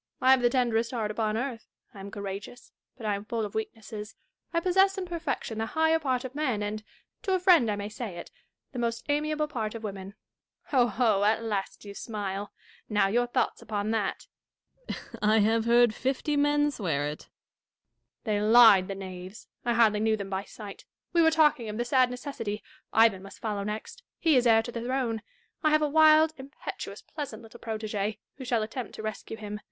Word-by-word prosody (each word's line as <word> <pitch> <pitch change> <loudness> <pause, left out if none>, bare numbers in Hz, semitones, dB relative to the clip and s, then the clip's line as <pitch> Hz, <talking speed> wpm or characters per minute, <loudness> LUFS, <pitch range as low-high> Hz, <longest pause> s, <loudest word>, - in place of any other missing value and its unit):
I 260 - +5
have 265 -1 +6
the 240 - +4
tenderest 235 -2 +1
heai't 220 -3 -1
upon 215 0 -1
earth. 245 -1 -4 0.3
I 200 - -11
am 195 +1 -7
courageous, 200 +4 -7 0.3
but 230 - -8
I 210 - +1
am 200 0 -4
full 225 0 -2
of 205 - -8
weaknesses. 220 -1 -6 0.4
I 335 - +2
possess 385 +3 +3
in 380 - -2
perfection 320 -10 -3
the 225 - -1
higher 320 0 +4
part 260 -4 -1
of 260 - -6
men, 260 -8 -1
and 215 +1 -4 0.2
— - - -56
to 380 -2 +1
a - - +1
friend 350 - +5
I 210 - 0
may 205 0 -4
say 215 -3 -6
it - - -9 0.2
— - - -57
the 250 - -4
most 235 +2 -2
amiaV)le 300 +1 0
part 225 -7 -3
of 225 - -7
women. 195 -1 -6 0.5
Ho, 250 -4 +4
ho! 220 -3 +2
at 220 +2 +2
last 205 -2 -3
you 200 - -8
smile: 200 -2 -4 0.4
now, 205 -2 +3
your 240 +4 +2
thoughts 245 0 -1
upon 210 0 -2
that. 220 -3 -1 0.6
Dashkof. - - -7
I 215 +1 +4
have 220 +1 +3
heard 235 -1 +5
fifty 270 +5 -1
men 290 0 +3
swear 160 - -1
it. 150 +1 -5
Catharine. - - -27
They 210 -3 0
lied, 215 -4 +7
the 195 - -4
knaves! 185 +1 -9 0.2
I 240 - +1
hardly 220 -3 +4
knew 220 0 +2
them 200 -1 -6
by 190 +1 -2
sight. 205 -3 -10 0.3
We 340 - +5
were 320 - +6
talking 300 -7 +3
of 210 - -5
the 240 - -1
sad 255 0 +4
necessity. 245 -5 -5 0.2
— - - -44
Ivan 220 -4 +4
must 195 +1 -11
follow 210 -3 -3
next: 210 - -5 0.2
he 320 -3 +3
is 250 -1 +4
heir 225 -1 +5
to 240 - -6
the 235 - -5
throne. 240 -3 -1 0.4
I 310 - +3
have 305 0 +3
a - - +3
wild, 315 +1 +6
impetuous, 270 +2 -7
pleasant 270 -8 -7
little 225 - -13
protege, 215 -2 -3 0.2
who 265 - -7
shall 235 -3 +1
attempt 225 +1 -6
to 215 - -7
rescue 215 +1 -5
him. 210 -1 -6
225 Hz, 210 wpm, -28 LUFS, 210-265 Hz, 0.6 s, lied